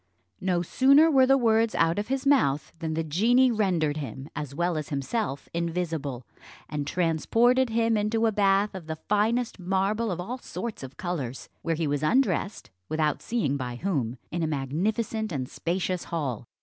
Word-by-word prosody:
No 180 -2 0
sooner 275 - +5
were 265 -3 +5
the 270 +1 +5
words 225 -2 +2
out 165 +3 +2
of 210 - -3
his 270 +2 -2
mouth 155 - +2
than 160 -1 -3
the 165 - 0
genie 235 - +3
rendered 175 -9 +1
him, 135 0 -6
as 140 -2 -5
well 175 +1 0
as 155 -2 -4
himself, 140 - -2
invisible, 165 -7 -3 0.4
and 145 -2 -4
transported 225 +11 +2
him 225 0 +2
into 215 +2 +1
a 225 - +3
bath 200 0 +2
of 185 -4 -8
the 160 - -3
finest 215 +6 0
marble 195 +5 0
of 180 -2 -3
all 240 +9 -4
sorts 235 -2 -6
of 135 0 -9
colours; 145 -9 -4
where 165 -1 -1
he 160 +1 -1
was 145 -1 -1
undressed, 215 - 0 0.2
without 155 -2 0
seeing 190 - -1
by 125 -2 -4
whom, 130 - -2
in 175 - -2
a 160 - +1
magnificent 200 - -1
and 130 -5 -3
spacious 180 +3 -2
hall. 130 -9 -3
180 Hz, 175 wpm, -27 LUFS, 150-225 Hz, 0.4 s, sooner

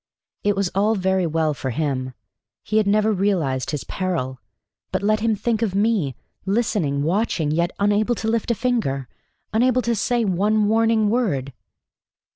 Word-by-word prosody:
It 205 -1 +2
was 195 -2 0
all 210 +3 +2
very 190 -2 +1
well 160 -1 0
for 135 -2 -4
him. 130 -2 -2 0.5
He 215 - -1
had 215 -2 +3
never 215 +1 +3
realized 175 -10 0
his 150 -3 -3
peril. 165 -9 -3 0.5
But 185 +1 -1
let 215 +1 +2
him 225 0 +1
think 220 +2 -1
of 205 -5 0
me 200 - +1 0.3
listening, 195 -9 0
watching, 170 -3 0
yet 170 +2 +1
unable 205 +3 +2
to 220 - -4
lift 225 0 0
a 235 - +2
finger 215 - -1 0.5
unable 250 +2 +3
to 235 +1 +1
say 235 +2 0
one 205 +3 +2
warning 220 -1 +3
word. 145 - 0
200 Hz, 160 wpm, -22 LUFS, 160-220 Hz, 0.5 s, had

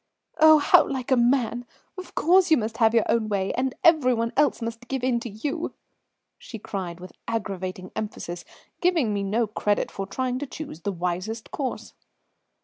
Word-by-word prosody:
"Oh, 315 0 +8
how 290 - +5
like 265 -1 -4
a - - +6
man! 240 -1 +2 0.3
Of 370 -1 -10
course 360 +3 +4
you 315 - +6
must 225 -1 -3
have 225 0 +3
your 225 - +5
own 225 -2 +1
way, 195 -2 -1
and 260 0 -1
every 305 -8 +5
one 230 0 -2
else 290 -1 +2
must 230 +1 -6
give 265 -1 -3
in 250 -2 +2
to 235 - -6
you," 285 - -4 0.6
she 225 - -9
cried 185 -5 -5
with 185 +1 -10 0.2
aggravating 190 -4 -4
emphasis, 175 -5 -5 0.4
giving 330 - +2
me 200 - -1
no 215 +4 +1
credit 210 -1 -1
for 195 -1 -5
trying 255 +4 -2
to 290 - -5
choose 300 - -8
the 200 - -2
wisest 180 +5 -4
course. 270 -3 -4
230 Hz, 180 wpm, -25 LUFS, 205-265 Hz, 0.6 s, Oh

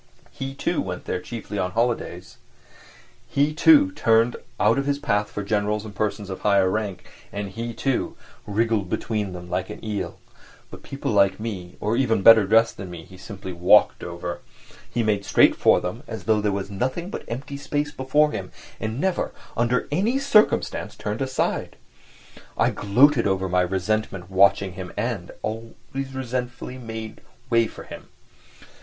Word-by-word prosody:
He, 135 -1 -6
too, 165 +4 0
went 90 -2 -5
there 90 - -2
chiefly 110 -3 -6
on 90 -1 -1
holidays, 115 -6 -2 0.9
He, 145 +2 +1
too, 290 - +6
turned 115 - +3 0.2
out 115 +5 +4
of 140 - -2
his 140 0 +1
path 105 -6 0
for 105 - -5
generals 105 +1 0
and 105 - -8
persons 100 -1 -2
of 95 - -5
high 100 -1 +3
rank, 95 -1 -1 0.3
and 100 -1 -4
he 115 +4 -5
too, 135 -2 -1 0.3
wriggled 105 -2 0
between 105 -3 -2
them 90 -1 -8
like 90 +1 -2
an - - -8
eel; 105 -3 -3 0.5
but - - -10
people, 140 -3 -4
like 100 -2 +3
me, 95 -5 -6
or 105 +2 0
even 115 -6 +2
better 110 -2 +8
dressed 115 +2 +4
than 95 -3 -7
me, 85 -2 -8
he 95 +2 -15
simply 95 0 -8
walked 85 +1 +4
over; 85 0 -5 0.5
he 120 - -1
made 105 -2 +1
straight - - +5
for - - +4
them 90 +7 -5
as 110 -5 -6
though 110 +2 +2
there 105 -1 +1
was 100 0 -3
nothing 130 - -2
but - - -5
empty 135 +4 -5
space 145 +1 -2
before 150 +3 +2
him, 95 -8 -5 0.3
and 110 +3 -3
never, 190 +3 0 0.2
under 120 +2 +1
any 205 - +1
circumstances, 275 -6 +2
turned 105 +3 -4
aside. 130 -1 -1 0.8
I - - +3
gloated 120 +4 +4
over 95 -1 0
my 90 0 +2
resentment 95 0 -2
watching 95 0 +4
him 90 -1 -7
and... 105 -5 -2
always 115 +4 -6
resentfully 125 0 -4
made 110 -2 -7 0.3
way 115 -1 +4
for - - -11
him. - - -10
110 Hz, 165 wpm, -24 LUFS, 95-125 Hz, 0.9 s, better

